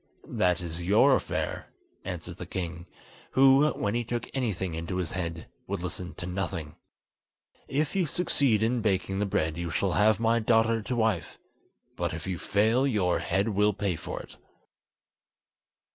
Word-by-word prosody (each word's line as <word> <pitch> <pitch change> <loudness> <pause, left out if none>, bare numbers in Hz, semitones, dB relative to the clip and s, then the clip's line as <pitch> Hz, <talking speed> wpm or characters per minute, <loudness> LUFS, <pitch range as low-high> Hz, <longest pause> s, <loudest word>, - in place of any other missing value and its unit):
"That 90 -1 +1
is 85 0 -5
your 105 +10 +5
affair," - - -3 0.4
answered 90 -1 -6
the 90 - -7
King, 85 -1 -5 0.5
who, 135 +3 +6
when 100 -7 -2
he 120 0 0
took 120 +1 -3
anything 100 -9 -1
into 85 +3 -4
his 90 -3 -2
head, 85 -3 -4 0.2
would 95 -2 -3
listen 90 0 -5
to 90 - -6
nothing. 90 -5 -4 0.9
"If 145 +4 -1
you 185 -4 +2
succeed 135 - +2
in 120 +1 +1
baking 95 -2 0
the 105 - 0
bread 80 -4 0
you 85 -1 -3
shall 95 +3 0
have 105 +2 +3
my 115 0 +3
daughter 115 0 +3
to 125 +4 -3
wife, 110 -7 0 0.6
but - - -2
if 80 - -6
you 95 -3 -3
fail 110 +6 +2
your 100 -8 +1
head 100 +3 0
will 105 0 +2
pay 100 -2 -1
for - - -6
it." - - -14
100 Hz, 160 wpm, -28 LUFS, 90-115 Hz, 0.9 s, who